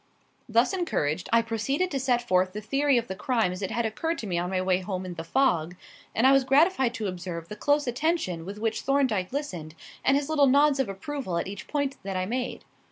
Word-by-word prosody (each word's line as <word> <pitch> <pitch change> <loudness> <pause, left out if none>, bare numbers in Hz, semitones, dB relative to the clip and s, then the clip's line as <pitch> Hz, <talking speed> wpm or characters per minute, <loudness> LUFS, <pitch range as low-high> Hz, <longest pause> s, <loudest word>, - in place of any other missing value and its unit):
Thus 235 - +3
encouraged, 175 - -1
I 230 0 +4
proceeded 270 - -1
to 275 - -1
set 245 -2 0
forth 185 -1 +2
the 210 - -4
theory 275 +5 +2
of 235 0 -1
the - - -4
crime 220 -1 0
as 180 +2 -6
it 195 - -2
had 235 0 -1
occurred 325 +10 -2
to - - -5
me 175 -4 -1
on 175 +1 -2
my 185 -1 0
way 185 0 +2
home 185 -1 -4
in 180 - -5
the 165 -1 -6
fog, 175 - +1 0.4
and 230 - +3
I 265 - +7
was 275 -1 +5
gratified 270 -2 +3
to 220 - -3
observe 175 -2 -6
the 210 - -6
close 290 +4 +1
attention 245 - -1
with 200 +4 -7
which 225 +1 -1
Thorndyke 260 -9 +1
listened, 175 - -5 0.3
and 270 - +4
his 285 -1 -2
little 300 -3 +4
nods 285 +1 +4
of 265 - +1
approval 195 - -4
at - - -1
each 195 +1 -7
point 285 -2 -1
that 195 -1 -4
I 185 - 0
made. 245 +3 -3
230 Hz, 230 wpm, -27 LUFS, 185-275 Hz, 0.4 s, I